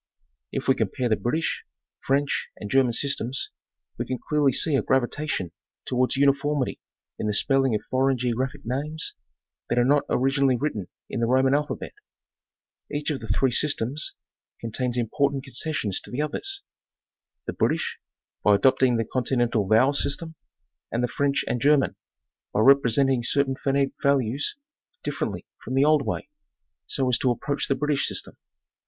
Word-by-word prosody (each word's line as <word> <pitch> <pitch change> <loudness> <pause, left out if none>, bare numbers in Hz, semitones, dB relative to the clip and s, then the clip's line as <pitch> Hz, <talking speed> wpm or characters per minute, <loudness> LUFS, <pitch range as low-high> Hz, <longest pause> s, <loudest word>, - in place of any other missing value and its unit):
If - - -3
we 135 - +6
compare 130 -1 -1
the 110 - +4
British, 155 +10 -1 0.4
French 140 +1 0
and 105 - -7
German 130 -3 +4
systems, 135 0 -1 0.5
we - - -1
can 130 - -2
clearly 150 -2 +3
see 155 +4 +1
a - - +3
gravitation 130 - 0 0.3
towards 130 +2 +1
uniformity 140 0 +2 0.4
in 105 - -1
the 105 - +1
spelling 135 -1 +3
of 105 - -2
foreign 130 0 +1
geographic 130 +4 -2
names 150 +6 -2 0.6
that 120 - 0
are 120 - +4
not 145 +2 +3
originally 135 0 +2
written 110 -9 -2 0.2
in - - -4
the 115 - +1
Roman 130 +2 +3
alphabet. 150 +1 -2 1.0
Each 145 +1 -1
of 140 - -2
the 110 - -8
three 130 +2 +2
systems 145 0 -1 0.4
contains 120 +2 -3
1mpor 135 +4 +1
tant 135 -1 -4
concessions 135 -6 -2
to - - -14
the 135 +4 -1
others; 390 - -3 0.8
the - - -3
British, - - 0 0.4
by 105 - +6
adopting 130 +2 +4
the 115 - 0
con 130 +3 -1
tinental 120 -6 +1
vowel 130 +6 +5
system, 160 +3 -1 0.6
and 120 +1 0
the - - +2
French 140 0 +1
and 120 - -1
German, 145 -1 +3 0.6
by 105 - +2
represent 135 +1 +5
ing 130 -2 +1
certain 135 +3 +1
phonetic 135 0 +1
values 140 -1 +1 0.5
differently - - -3 0.2
from 130 - -4
the 135 +2 +4
old 150 -2 +3
way, - - -2 0.6
so 135 -2 0
as 125 - +2
to 130 - +2
approach 140 +4 -1
the 135 - +2
British 150 -1 +1
system. - - -4
135 Hz, 160 wpm, -25 LUFS, 120-140 Hz, 1.0 s, we